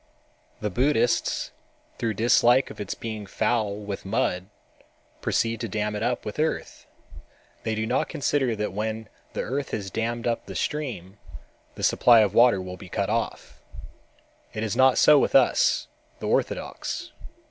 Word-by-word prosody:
The 105 -1 -2
Buddhists, 120 +1 +1 0.5
through 110 -2 -1
dislike 120 +3 +4
of - - -8
its 100 - -4
being 110 -3 -6
foul 105 0 0
with 100 -1 -6
mud, 90 -1 -1 0.7
proceed 115 -1 0
to 115 - -2
dam 105 +1 -2
it 105 - -4
up 125 0 -1
with 105 - -6
earth. 160 +1 -2 0.7
They 110 - -2
do 110 0 -1
not 125 +3 0
consider 135 -4 0
that 105 -2 -3
when 110 +1 -3 0.2
the - - -2
earth 135 +3 -3
has 95 -3 -4
dammed 115 +2 -2
up 120 -1 -1
the - - -7
stream, 120 - -4 0.6
the - - -7
supply 120 -2 +6
of 105 -2 +1
water 120 -3 +5
will 90 0 -7
be 95 -2 -12
cut 100 +3 -1
off. 115 0 -3 0.9
It 110 - -2
is 110 -3 -2
not 130 -1 +5
so 150 -1 +7
with - - 0
us, - - +4 0.3
the - - -7
orthodox. - - -2
110 Hz, 160 wpm, -25 LUFS, 105-125 Hz, 0.9 s, so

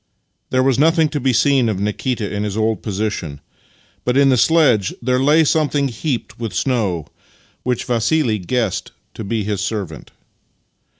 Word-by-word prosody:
There 130 0 +2
was 135 -1 +2
nothing 160 +1 +4
to 145 - -3
be 130 0 +1
seen 125 0 +3
of 100 -3 -2
Nikita 105 +2 -2
in 105 - -2
his 105 0 -3
old 110 0 0
posi 105 0 -2
tion, 75 -8 -6 0.6
but 125 +1 0
in 140 -1 +5
the 130 - +4
sledge 125 - +3
there 125 +1 0
lay 150 +4 +4
something 145 -2 +1
heaped 125 +1 -4
with 115 -6 -4
snow, 100 - 0 0.6
which 125 -2 -2
Vassili 120 -1 +1
guessed 95 -1 -2 0.2
to - - -7
be 110 +1 -2
his 100 -1 -2
servant. 100 -2 -4
120 Hz, 165 wpm, -19 LUFS, 105-135 Hz, 0.6 s, in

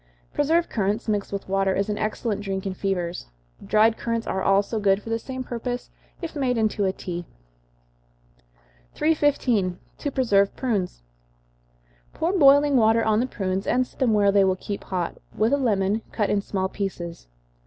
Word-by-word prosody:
Preserved 325 +4 +2
currants, 210 +1 -1
mixed 205 -2 -1
with 200 -1 -4
water, 195 0 +1
is 200 - 0
an 210 -1 -2
excellent 215 -1 -2
drink 195 -1 -3
in 195 - -2
fevers. 180 - -3 0.4
Dried 220 +1 +3
currants 230 -1 -2
are 190 - -2
also 200 +3 +2
good 195 -1 +3
for 225 +2 -8
the 225 - 0
same 260 +2 -6
purpose, 245 0 -5 0.3
if 330 -1 -5
made 255 -4 0
into 215 -2 +1
a 190 - +2
tea. 175 -2 -6 1.7
315. 260 - +1 0.2
To 285 - -2
Preserve 200 -7 +2
Prunes. 200 - -2 1.1
Pour 335 +4 -1
boiling 285 -4 +6
water 225 0 +4
on 220 -1 +2
the 250 - +1
prunes, 190 -4 -3
and 255 +1 +2
set - - -23
them 255 -4 +3
where 200 -1 +4
they 200 0 +5
will 190 -1 +2
keep 200 +2 -6
hot, 180 -3 -3 0.2
with 220 +5 +2
a - - +4
lemon, 210 -4 +1
cut 210 -3 0
in 205 - +2
small 190 -1 -2
pieces. 175 - -5
210 Hz, 170 wpm, -24 LUFS, 195-245 Hz, 1.7 s, boiling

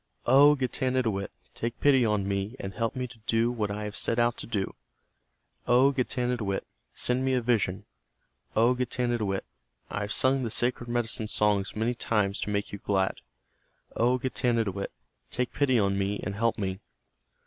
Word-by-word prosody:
"O 140 +4 +7
Getanittowit, 125 -6 -1 0.2
take 115 +1 -4
pity 135 -3 +5
on 105 -3 +1
me 100 +4 -2
and 95 0 -5
help 115 +2 -2
me 125 0 -2
to 115 -1 -15
do 115 +1 +2
what 110 -4 -2
I 105 +1 -4
have 105 0 -5
set 115 - 0
out 120 0 +3
to - - -5
do. 105 -4 -2 0.9
O 125 +3 +5
Getanittowit, 125 -6 -1 0.3
send 125 +1 0
me 130 0 +2
a 125 - +1
vision. 105 -6 0 0.7
O 115 +3 +5
Getanittowit, 120 -5 -1 0.5
I - - -2
have 105 0 -3
sung 130 +3 +3
the 120 - -2
sacred 120 +1 0
medicine 115 -2 -1
songs 105 -2 +1
many 110 +3 0
times 105 -4 0
to - - -3
make 100 0 -2
you 100 - -5
glad. 95 -1 0 0.7
O 125 +2 +3
Getanittowit, 115 -6 -1 0.4
take 125 0 -2
pity 135 -3 +2
on 100 -2 +2
me 100 +1 -1
and 95 - -3
help 115 +2 0
me." 95 -2 -3
115 Hz, 165 wpm, -28 LUFS, 100-125 Hz, 0.9 s, O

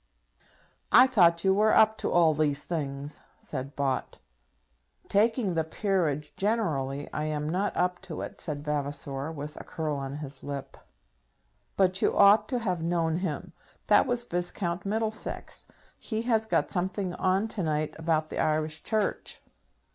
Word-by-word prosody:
"I 250 - +9
thought 170 -9 +4
you 190 -1 +4
were 215 +2 +4
up 220 0 +6
to - - -1
all 170 -2 +5
these 145 -1 +1
things?" 145 -3 -4 0.2
said 140 0 -6
Bott. 135 -2 -2 0.9
"Taking 220 -1 +2
the 165 -1 +1
peerage 160 -5 -1
generally, 150 -11 -1
I 150 - -2
am 150 -1 -2
not 185 +6 -1
up 180 0 0
to - - -5
it," - - -7
said 150 -2 -5
Vavasor, 145 0 -2
with 150 -1 -7
a - - -10
curl 155 -3 -3
on 135 0 -5
his 140 -2 -7
lip. 140 -1 -6 1.0
"But 185 -1 +3
you - - +2
ought 205 +1 +6
to 255 - 0
have 185 -8 -1
known 165 -1 0
him. 175 -5 -4 0.3
That - - +5
was 245 -1 0
Viscount 175 -2 -2
Middlesex; 220 +1 -3 0.3
he 220 -1 -3
has 225 -2 +1
got - - +1
something 185 0 -1
on 190 +4 +1
to 210 - -3
night 155 -2 -1
about 160 -1 0
the - - -3
Irish 155 0 0
Church. 215 -2 -1
170 Hz, 155 wpm, -28 LUFS, 150-200 Hz, 1.0 s, I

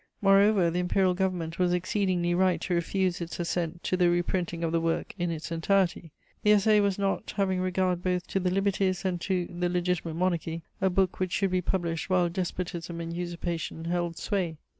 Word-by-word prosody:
Moreover, 195 -2 +4
the 175 - -1
Imperial 180 +1 +2
Government 180 -3 -2
was 180 -1 +3
exceedingly 180 -1 0
right 180 -1 +2
to 180 - -2
refuse 180 +1 0
its 170 +1 -5
assent 175 0 -2
to - - 0
the 180 -1 +3
reprinting 175 -1 -1
of 165 - 0
the 165 0 +1
work 165 0 -1
in 175 0 0
its 160 0 -5
entirety: 170 -1 +1 0.3
the 210 - +2
Essai 210 +1 +4
was 200 -2 +1
not, 200 +1 -1
having 190 -2 +1
regard 185 -1 0
both 180 -1 -1
to 195 - 0
the 180 -1 0
liberties 195 0 0
and 180 -2 -1
to 185 -2 0
the 175 0 -2
Legitimate 175 -2 -1
Monarchy, 170 -2 -1 0.2
a 190 - +3
book 185 0 +1
which 185 -1 -1
should 195 -2 +1
be 185 0 +1
published 170 -2 -2
while 180 -2 +3
despotism 175 -1 -4
and 165 0 -4
usurpation 170 -2 -4
held 170 -1 -1
sway. 180 -6 -2
180 Hz, 190 wpm, -28 LUFS, 170-190 Hz, 0.3 s, Moreover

